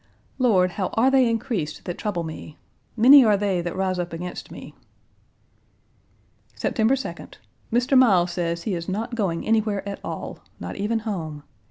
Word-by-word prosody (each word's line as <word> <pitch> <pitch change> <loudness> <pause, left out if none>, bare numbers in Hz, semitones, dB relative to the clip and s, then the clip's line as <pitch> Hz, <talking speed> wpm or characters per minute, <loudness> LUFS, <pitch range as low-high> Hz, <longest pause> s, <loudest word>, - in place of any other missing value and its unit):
Lord, 190 -8 +3
how 185 0 -2
are 250 +4 +4
they 260 -3 +4
increased 215 - -3
that 175 - -4
trouble 185 -5 -2
me? 155 -1 -8 0.4
Many 265 +5 +9
are 210 -3 +4
they 195 -3 0
that 175 +1 -4
rise 185 -1 -1
up 175 -1 -4
against 175 +2 -6
me!" - - -10 1.8
September 225 +3 +1
2d. 265 - -7 0.4
Mr. 245 +4 +2
Miles 190 -9 +5
says 170 -1 -2
he 205 - -2
is 170 0 -4
not 225 +5 -3
going 190 -8 -1
anywhere 215 -3 0
at 200 - -5
all, - - -6 0.2
not - - -6
even 220 +3 -1
home. 160 -8 -4
200 Hz, 160 wpm, -24 LUFS, 175-230 Hz, 1.8 s, Many